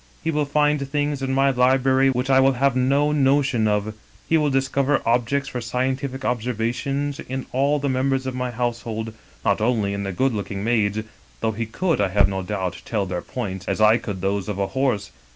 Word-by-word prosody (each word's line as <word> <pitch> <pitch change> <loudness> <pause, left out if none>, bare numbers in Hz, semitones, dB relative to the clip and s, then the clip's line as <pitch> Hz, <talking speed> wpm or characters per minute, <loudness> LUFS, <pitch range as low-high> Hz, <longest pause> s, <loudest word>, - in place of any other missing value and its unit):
He 165 - 0
will 150 -1 0
find 150 0 +2
things 145 -1 -1
in 135 0 -1
my 135 +1 +3
library 130 +1 +3
which 130 +1 0
I 135 0 +6
have 135 +1 +1
no 140 +3 +2
notion 135 -5 +2
of. 105 0 0 0.3
He 165 - +2
will 150 -2 +3
dis 135 -1 +1
cover 135 +1 +1
objects 125 +4 +1
for 125 - -4
scientific 130 +3 -2
observation 125 +4 -1 0.2
in 130 0 -3
all 140 +3 +2
the 140 0 -2
members 130 0 0
of 130 - -3
my 125 0 -2
household, 115 -2 -3 0.3
not - - +2
only 110 -3 +1
in 100 - -3
the 100 -1 -3
good 130 +7 +1
looking 100 -1 -4
maids 105 -3 +1 0.2
— - - -30
though 110 - +1
he 110 +1 -4
could, 165 - 0
I 100 - +3
have 100 +1 +3
no 95 -1 -3
doubt, 95 -1 -3
tell 105 -4 -1
their 90 -2 -3
points 95 -7 -5
as - - -1
I 110 +1 +6
could 100 -4 -5
those 100 0 -1
of 105 - -3
a 100 - +1
horse. 125 -8 0
125 Hz, 205 wpm, -23 LUFS, 105-135 Hz, 0.3 s, I